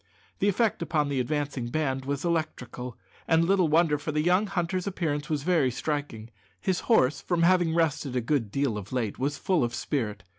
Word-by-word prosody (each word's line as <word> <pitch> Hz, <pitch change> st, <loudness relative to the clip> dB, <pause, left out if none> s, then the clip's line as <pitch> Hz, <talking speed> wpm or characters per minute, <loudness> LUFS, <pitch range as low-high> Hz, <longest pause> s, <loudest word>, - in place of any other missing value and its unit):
The 200 Hz, -, +2 dB
effect 215 Hz, 0 st, +1 dB
upon 150 Hz, -3 st, 0 dB
the 140 Hz, -2 st, 0 dB
advancing 140 Hz, -2 st, -2 dB
band 135 Hz, -1 st, -1 dB
was 140 Hz, +3 st, -2 dB
electrical; 145 Hz, -7 st, -3 dB, 0.3 s
and 165 Hz, 0 st, +4 dB
little 190 Hz, -1 st, +3 dB
wonder, 155 Hz, -1 st, +3 dB
for 155 Hz, -, -3 dB
the 150 Hz, 0 st, 0 dB
young 180 Hz, +5 st, +3 dB
hunter's 185 Hz, 0 st, -2 dB
appearance 155 Hz, -5 st, -2 dB
was 150 Hz, -3 st, -1 dB
very 160 Hz, -6 st, +3 dB
striking. 125 Hz, -4 st, -4 dB, 0.3 s
His 185 Hz, -2 st, 0 dB
horse, 145 Hz, -, +4 dB
from 175 Hz, -2 st, 0 dB
having 175 Hz, -2 st, +3 dB
rested 150 Hz, -5 st, 0 dB
a -, -, +2 dB
good 120 Hz, -3 st, 0 dB
deal 135 Hz, -4 st, 0 dB
of 100 Hz, 0 st, -11 dB
late, 120 Hz, -5 st, -2 dB
was 145 Hz, +2 st, -1 dB
full 180 Hz, -8 st, +1 dB
of 120 Hz, 0 st, -2 dB
spirit. 105 Hz, -10 st, -2 dB
150 Hz, 190 wpm, -27 LUFS, 130-170 Hz, 0.3 s, and